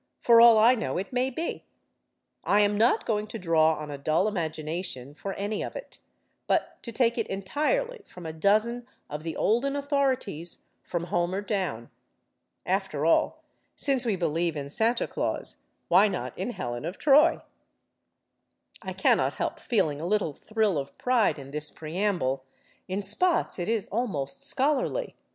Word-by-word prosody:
For 230 -1 +6
all 235 -1 +8
I 225 +3 +6
know, 230 -7 -2
it 195 +6 -4
may 255 +1 +1
be. 320 +6 -4 0.8
I 205 - +3
am 205 0 +2
not 225 +4 +3
going 210 -1 -1
to 225 - -6
draw 160 -4 +3
on 150 -1 -7
a 140 - -6
dull 155 +7 +1
imagination 160 -6 -4
for 195 +5 -6
any 205 +2 -2
of - - -6
it, - - -8 0.5
but - - 0
to 235 - -6
take 235 0 +1
it 225 - -1
entirely 305 - -1
from 180 -2 -11
a 160 - -5
dozen 215 +8 +1 0.2
of 150 +1 -4
the 165 0 -5
olden 255 +6 +1
authorities, 270 - -1 0.2
from 175 -2 -3
Homer 175 +2 -1
down. 185 - -3 0.7
After 185 -6 -1
all, 165 - +2 0.3
since 270 -3 +1
we 225 -5 0
believe 165 -2 -1
in 140 -1 -5
Santa 230 +9 +2
Claus, - - -3 0.3
why 190 +5 +6
not 200 - -4
in - - -3
Helen 120 - -4
of 175 +5 -5
Troy? 300 +3 +5 1.4
(I - - -5
cannot - - +2
help - - -3
feeling 160 - 0
a 170 - -3
little 200 -6 +1
thrill 215 -2 0
of 140 0 -7
pride 245 -8 +2
in 140 -1 -10
this 150 +1 0
preamble. 160 -5 -2 0.4
In 195 +2 -3
spots, 330 - 0
it 175 - -2
is 225 -4 0
almost 175 - -2
scholarly. 295 - 0
200 Hz, 160 wpm, -27 LUFS, 160-235 Hz, 1.4 s, all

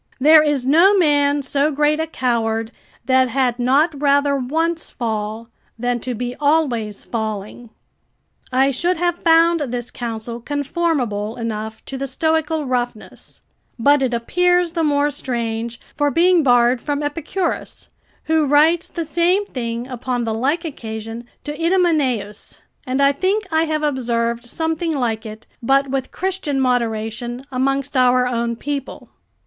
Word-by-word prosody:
There 310 +3 +7
is 295 -4 0
no 340 +9 +5
man 290 -4 +3
so 280 +2 +1
great 300 +1 +1
a 320 - -1
coward, 225 -5 -1 0.3
that 260 -1 +3
had 250 -1 0
not 280 +4 +2
rather 285 0 +3
once 320 +6 -1
fall 220 -1 -4 0.3
than 245 +1 -1
to 250 +1 -4
be 245 +2 -4
always 270 -9 0
falling." 220 +1 -5 0.8
I 265 +2 +3
should 345 +7 0
have 350 +1 0
found 335 0 +4
this 245 -4 -4
counsel 230 0 -5
conformable 275 -7 -1
enough 220 -1 -5
to 270 - -6
the 275 - -2
Stoical 315 +2 0
roughness: 245 -3 -4 0.4
but 285 +4 +4
it 260 -2 +1
appears 355 +9 +1
the 335 0 -1
more 290 -1 +2
strange, 235 -4 -3 0.2
for 290 -1 +1
being 345 +3 +4
borrowed 245 -2 +3
from 290 0 -2
Epicurus, 330 +5 -3 0.3
who 315 -2 +1
writes 320 +5 +4
the 335 -2 -4
same 350 +6 +1
thing 235 - -4
upon 250 -1 -3
the 225 -1 -2
like 285 +10 0
occasion 225 -4 -6 0.2
to 295 - -4
Idomeneus. 300 - 0 0.3
And 260 +2 0
I 280 0 +5
think 385 +9 0
I 320 +1 +3
have 310 -1 -2
observed 235 -4 -1
something 320 +5 -2
like 230 -5 -2
it, 215 +1 -10 0.2
but 275 +3 +2
with 270 -1 -2
Christian 370 -7 -2
moderation, 240 0 -1
amongst 275 +2 -1
our 250 0 +4
own 235 -1 -1
people. 280 +2 -5
270 Hz, 145 wpm, -20 LUFS, 235-310 Hz, 0.8 s, There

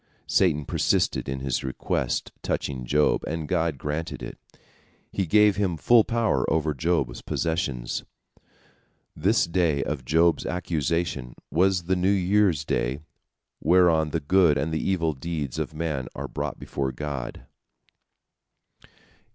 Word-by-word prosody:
Satan 75 -6 +2
persisted - - +1
in 65 0 -3
his 65 -2 -1
request 65 -1 -2
touching 65 -3 -3
Job, 75 +4 +2
and 80 -1 -3
God 85 -4 0
granted 75 +4 -4
it, - - -7 0.7
He 95 -3 -1
gave 105 +2 +5
him 95 -5 0
full 115 +7 +5
power 110 - +1
over 80 -1 +1
Job's 80 -4 -1
possessions. 80 -8 -2 1.1
This - - +2
day 85 -5 +1
of 75 -3 -3
Job's 80 +4 +3
accusation 80 -6 -2 0.2
was 90 +1 +2
the 95 +2 +1
New 90 +1 +1
Year's 95 -5 +2
Day, 65 +3 -1 0.6
whereon 85 -3 +4
the 80 - -1
good 80 0 +4
and 75 +4 -1
the 80 - 0
evil 85 -5 +1
deeds 75 -2 -4
of - - -2
man 75 -5 -2
are - - -4
brought - - -4
before 70 -1 -3
God. 70 -1 -5
80 Hz, 130 wpm, -25 LUFS, 70-90 Hz, 1.1 s, gave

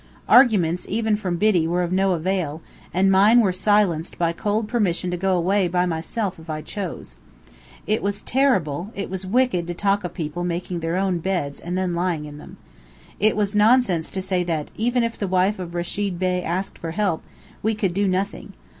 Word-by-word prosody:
Arguments, 195 -9 +4
even 220 0 +1
from 190 -4 -2
Biddy, 185 -5 +3
were 175 +2 0
of 175 - -3
no 190 0 +2
avail, 170 -3 -2 0.3
and 195 +2 +3
mine 205 +5 +6
were 205 -5 +3
silenced 185 -3 +1
by 170 -2 +1
cold 210 +5 -1
permission 190 -6 0
to - - -1
go 190 0 +1
away 190 +2 +2
by 180 +1 +1
myself 180 +3 -3
if 160 0 -14
I 155 0 -4
chose. 175 - -6 0.7
It 215 +1 0
was 200 +1 -2
terrible, 200 - +1
it 200 -2 -4
was 190 0 -3
wicked 215 -6 +1
to 175 - -4
talk 200 +2 +1
of 180 -1 -6
people 160 +2 -4
making 175 0 -3
their 165 +2 -2
own 190 -2 0
beds 170 -6 -2
and 175 +2 -4
then 185 -2 -1
lying 170 -3 -1
in 150 0 -9
them. - - -12 0.6
It 215 +1 +3
was 205 0 0
nonsense 210 -6 +3
to 190 - -3
say 185 -1 0
that, 160 -4 -3
even 240 +2 +1
if 230 0 -3
the 200 - -1
wife 185 +2 +1
of 175 -1 -6
Rechid 180 +2 -2
Bey 180 0 0
asked 180 +3 -3
for 165 - -5
help, 180 -1 -1 0.4
we 220 +1 0
could 195 -4 -1
do 200 +2 +1
nothing. 190 +2 -2
185 Hz, 200 wpm, -23 LUFS, 175-205 Hz, 0.7 s, mine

